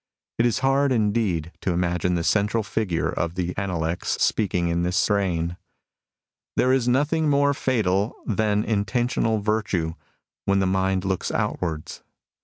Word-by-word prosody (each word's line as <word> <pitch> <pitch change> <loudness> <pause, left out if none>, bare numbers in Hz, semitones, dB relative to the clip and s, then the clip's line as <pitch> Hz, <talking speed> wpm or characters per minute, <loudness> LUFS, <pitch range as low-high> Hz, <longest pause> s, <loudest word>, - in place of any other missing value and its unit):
It 120 - +4
is 115 - 0
hard, 135 +1 +3
indeed, 105 -8 0
to 90 - 0
imagine 90 0 0
the 85 - -1
central 105 +4 +1
figure 95 -4 -1
of 85 0 -2
the 90 -1 -2
Analects 85 -4 -2
speaking 90 -5 +1
in 85 0 0
this 90 +2 0
strain: 90 -6 0 0.3
— - - -66
" - - -45
There 130 +1 +4
is 130 -2 +1
nothing 150 +5 +2
more 140 0 +3
fatal 105 -6 0
than 105 -1 +1
intentional 115 +1 0
virtue, 100 -6 0 0.5
when 100 0 +2
the 95 - +2
mind 95 0 +1
looks 95 -1 -1
outwards. 80 -3 -3
100 Hz, 150 wpm, -24 LUFS, 90-115 Hz, 0.5 s, It